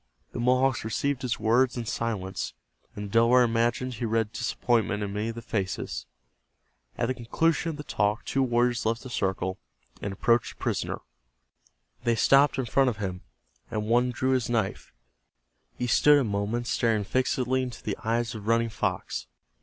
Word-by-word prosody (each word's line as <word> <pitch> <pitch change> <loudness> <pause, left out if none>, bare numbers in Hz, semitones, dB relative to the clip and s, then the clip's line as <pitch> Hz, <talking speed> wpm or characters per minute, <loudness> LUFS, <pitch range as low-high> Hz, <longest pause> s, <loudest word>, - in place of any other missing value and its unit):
The - - -5
Mohawks 130 +1 +2
received 130 +5 -1
his 125 -3 -2
words 120 +4 +3
in 120 - -3
silence, 100 - -3 0.4
and 105 - -5
the 100 - -9
Delaware 120 +2 +6
imagined 120 +2 +1
he 120 +1 -3
read 110 -1 0
disappointment 120 -3 0
in 100 -1 -4
many 105 +2 -2
of 115 - -5
the 115 - -7
faces. 100 -5 -3 0.9
At 120 - +1
the 130 - 0
conclusion 165 +8 0
of 155 - -5
the 150 - -6
talk 105 -5 0
two 135 - 0
warriors 120 -1 +2
left 115 +1 -1
the 130 - -8
circle, 95 -3 -1 0.4
and 100 - -3
approached 115 +4 +1
the - - -34
prisoner. - - -2 1.0
They 120 -1 +2
stopped 140 +6 +5
in 130 - 0
front 135 +2 +3
of 115 - -4
him, 95 -3 -4 0.5
and 105 0 -2
one 120 +3 +3
drew 130 +2 0
his 130 -3 +1
knife. 110 -5 -1 0.9
He 125 - -1
stood 145 +5 +5
a 140 - +3
moment 105 +2 -1
staring 115 -3 +1
fixedly 130 +3 0
into 125 -2 -6
the 105 - -2
eyes 115 0 0
of 110 -2 -8
Running 115 0 +3
Fox. - - -3
115 Hz, 175 wpm, -27 LUFS, 110-125 Hz, 1.0 s, Delaware